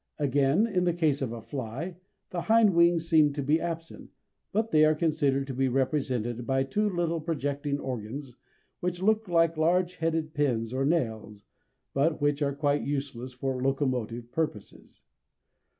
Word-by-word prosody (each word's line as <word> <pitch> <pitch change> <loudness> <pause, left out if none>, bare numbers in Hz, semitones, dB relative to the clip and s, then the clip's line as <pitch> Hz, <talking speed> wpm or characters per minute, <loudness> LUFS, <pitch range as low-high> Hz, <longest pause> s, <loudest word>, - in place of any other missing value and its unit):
Again 145 - +2
in 185 -6 0
the 175 -1 +1
case 155 -5 +1
of 130 -4 -2
a 115 -1 -7
fly, 140 +7 -5 0.4
the 175 - -2
hind 220 0 +4
wings 170 -1 +4
seem 155 -3 +4
to 140 -1 -3
be 150 +4 +2
absent, 165 -1 -6 0.4
but 220 +2 0
they 155 0 +5
are 155 0 +5
considered 150 -4 +1
to 135 - -5
be 135 +1 +1
represented 125 -3 -1
by 135 0 +2
two 210 +11 0
little 170 -3 -1
projecting 145 -2 -2
organs 125 +1 -6 0.4
which 180 +1 -3
look 220 +1 +2
like 165 -2 +2
large 175 +3 +2
headed 160 -1 -1
pins 125 -6 0
or 135 +1 0
nails, 110 -9 -1 0.5
but 155 +4 +1
which 145 0 +1
are 140 -1 0
quite 145 0 +1
useless 135 -3 -4
for 130 0 -3
locomotive 125 -4 -1
purposes. 135 -11 -5
145 Hz, 160 wpm, -28 LUFS, 130-165 Hz, 0.5 s, they